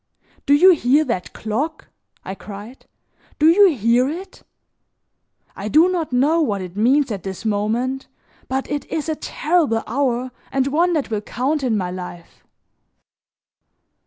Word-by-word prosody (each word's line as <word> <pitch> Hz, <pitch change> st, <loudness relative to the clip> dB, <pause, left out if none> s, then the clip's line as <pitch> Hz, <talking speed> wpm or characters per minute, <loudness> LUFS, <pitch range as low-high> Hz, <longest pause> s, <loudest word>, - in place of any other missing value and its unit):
"Do 285 Hz, -, +6 dB
you 370 Hz, +6 st, +7 dB
hear 290 Hz, -2 st, +3 dB
that 180 Hz, -, -3 dB
clock?" 265 Hz, +9 st, -4 dB, 0.4 s
I 190 Hz, -, -4 dB
cried, 205 Hz, +5 st, -11 dB, 0.5 s
"do 300 Hz, -, +2 dB
you 380 Hz, +3 st, +6 dB
hear 240 Hz, +3 st, +2 dB
it? 370 Hz, +5 st, -8 dB, 1.1 s
I 200 Hz, -, -5 dB
do 315 Hz, -, +5 dB
not 335 Hz, -6 st, -2 dB
know 290 Hz, +7 st, +3 dB
what 210 Hz, -10 st, 0 dB
it 180 Hz, 0 st, -9 dB
means 255 Hz, +5 st, +2 dB
at 200 Hz, -3 st, -4 dB
this 190 Hz, +4 st, -7 dB
moment, 225 Hz, +6 st, -1 dB, 0.4 s
but 265 Hz, +1 st, -2 dB
it 290 Hz, -1 st, -3 dB
is 315 Hz, -1 st, -2 dB
a 315 Hz, -, 0 dB
terrible 300 Hz, -8 st, 0 dB
hour 255 Hz, 0 st, -1 dB, 0.2 s
and 270 Hz, -1 st, +1 dB
one 335 Hz, +6 st, +2 dB
that 290 Hz, -7 st, -1 dB
will 210 Hz, -2 st, -1 dB
count 265 Hz, +8 st, -2 dB
in 240 Hz, -5 st, 0 dB
my 180 Hz, -2 st, -2 dB
life." 180 Hz, -2 st, -9 dB
260 Hz, 150 wpm, -20 LUFS, 215-305 Hz, 1.1 s, you